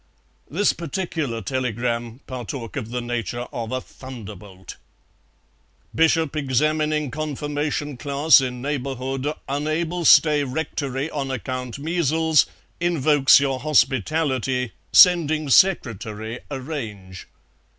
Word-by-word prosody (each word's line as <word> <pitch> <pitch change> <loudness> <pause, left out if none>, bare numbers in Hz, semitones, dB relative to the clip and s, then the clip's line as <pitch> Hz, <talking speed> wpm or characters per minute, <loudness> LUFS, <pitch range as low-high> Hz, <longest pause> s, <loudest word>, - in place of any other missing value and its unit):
This 200 +7 +2
particular 160 - -4
telegram 120 0 -3
partook 125 -2 -6
of 120 -6 -4
the 125 +1 -3
nature 120 0 -3
of 115 -2 -4
a 130 - -1
thunderbolt. 105 -8 -11 1.2
"Bishop 160 -1 +2
examining 150 +1 0
confirmation 150 -1 -3
class 140 +3 +4
in 125 -1 -4
neighbourhood 135 0 -3 0.2
unable 155 +5 -2
stay 145 0 +6
rectory 140 -1 -3
on 140 -2 -3
account 130 -1 -4
measles 160 0 +2 0.3
invokes 150 -6 +4
your 135 -2 -1
hospitality 130 -2 +1 0.2
sending 155 -5 +5
secretary 115 - +2
arrange." 115 - -7
135 Hz, 95 wpm, -22 LUFS, 125-155 Hz, 1.2 s, stay